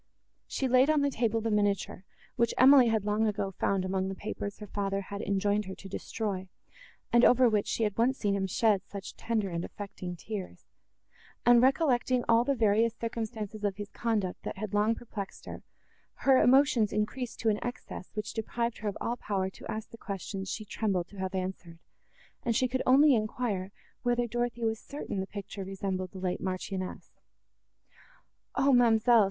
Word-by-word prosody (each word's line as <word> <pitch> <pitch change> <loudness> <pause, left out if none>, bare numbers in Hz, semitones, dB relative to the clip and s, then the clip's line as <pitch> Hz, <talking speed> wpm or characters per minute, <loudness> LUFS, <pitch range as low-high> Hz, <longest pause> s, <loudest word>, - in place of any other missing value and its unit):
She 265 - -1
laid 255 +3 +5
on 310 -1 +4
the 285 0 +1
table 225 -2 0
the 225 0 -1
miniature, 205 -2 0 0.3
which 235 -1 +1
Emily 260 -1 +8
had 220 -3 +1
long 210 +1 +2
ago 205 -2 -1
found 190 0 0
among 190 0 -1
the 195 - -4
papers 205 0 -5
her 210 - -8
father 195 -1 -2
had 200 +1 -6
enjoined 205 +1 +1
her 190 0 -6
to 195 - -11
destroy, 195 -1 -4 0.6
and 240 0 +6
over 250 0 +6
which 210 -3 +1
she 230 - 0
had 210 -2 0
once 260 +3 +3
seen 205 -2 0
him 195 -1 0
shed 205 +1 +2
such 200 -1 -8
tender 220 -4 -1
and 170 0 -2
affecting 185 -3 -7
tears; 195 +2 -7 0.8
and, 240 0 +7
recollecting 255 -2 +3
all 230 0 +5
the 275 +2 +1
various 225 0 +3
circumstances 220 -2 -5
of 200 -2 0
his 205 0 -7
conduct, 210 -6 -1
that - - -6
had 210 0 -5
long 210 +2 +3
perplexed 205 -5 -7
her, - - -7 0.6
her 265 -1 +6
emotions 250 -5 +4
increased 225 +4 -2
to 225 - +2
an 210 - 0
excess, 245 -6 -6
which 210 0 -4
deprived 235 +1 -2
her 215 - -4
of 200 - -6
all 240 +1 -2
power 190 -4 -2
to - - -12
ask 220 0 -5
the 230 - -10
questions 195 -1 -5
she 215 - -4
trembled 195 -4 -1
to 200 - -12
have 190 0 -3
answered, 185 -3 -4 0.6
and 235 -2 0
she 255 - +3
could 260 +1 -1
only 280 +3 +7
enquire, 215 -4 -1 0.3
whether 240 0 +1
Dorothée 240 0 -2
was 225 0 0
certain 280 -8 -5
the 190 - -3
picture 200 -1 -6
resembled 190 -1 -3
the 190 - -11
late 185 -1 -2
marchioness. 185 0 -4 1.4
"O, 275 0 +4
ma'amselle!" 235 -1 +5
215 Hz, 180 wpm, -30 LUFS, 195-240 Hz, 1.4 s, Emily